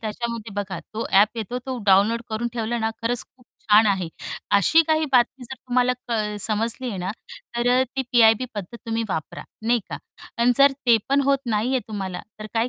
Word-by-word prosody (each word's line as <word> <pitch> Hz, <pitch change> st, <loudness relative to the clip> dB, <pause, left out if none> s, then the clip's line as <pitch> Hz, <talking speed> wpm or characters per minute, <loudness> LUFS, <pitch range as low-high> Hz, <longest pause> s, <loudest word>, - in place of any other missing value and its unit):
त्याच्यामध्ये 225 Hz, 0 st, -5 dB
बघा 195 Hz, -4 st, -4 dB
तो 220 Hz, +7 st, -6 dB
ॲप 205 Hz, +4 st, +4 dB
येतो. 230 Hz, +2 st, -3 dB
तो 260 Hz, -2 st, -3 dB
डाउनलोड 205 Hz, +4 st, +4 dB
करून 225 Hz, +2 st, -2 dB
ठेवलं 235 Hz, 0 st, -2 dB
ना, 220 Hz, 0 st, 0 dB
खरंच 240 Hz, 0 st, 0 dB
खूप 250 Hz, -1 st, -27 dB, 0.2 s
छान 215 Hz, 0 st, +5 dB
आहे. 190 Hz, -4 st, 0 dB, 0.5 s
अशी 320 Hz, -, +5 dB
काही 315 Hz, 0 st, +2 dB
बातमी 250 Hz, +1 st, +2 dB
जर 255 Hz, +2 st, -7 dB
तुम्हाला 250 Hz, 0 st, +1 dB, 0.2 s
क 235 Hz, -, -2 dB, 0.3 s
समजली 230 Hz, +4 st, -1 dB
आहे 200 Hz, -, -4 dB
ना, 180 Hz, +2 st, -3 dB, 0.5 s
तर 240 Hz, +1 st, +1 dB
अ, -, -, +5 dB
ती 265 Hz, -, +1 dB
पी-आय-बी 225 Hz, 0 st, +5 dB
पद्धत 205 Hz, +3 st, -6 dB
तुम्ही 225 Hz, 0 st, -1 dB
वापरा, 160 Hz, -5 st, -4 dB, 0.2 s
नाही 240 Hz, 0 st, +3 dB
का? -, -, -5 dB, 0.4 s
आणि 245 Hz, +1 st, +4 dB
जर 280 Hz, 0 st, +6 dB
ते 235 Hz, -2 st, +7 dB
पण 275 Hz, +1 st, +3 dB
होत 275 Hz, 0 st, +3 dB
नाहीये 235 Hz, +4 st, +1 dB
तुम्हाला, 190 Hz, -4 st, -4 dB, 0.2 s
तर 215 Hz, -, -7 dB
काय 230 Hz, +2 st, +1 dB
230 Hz, 195 wpm, -23 LUFS, 210-245 Hz, 0.5 s, ते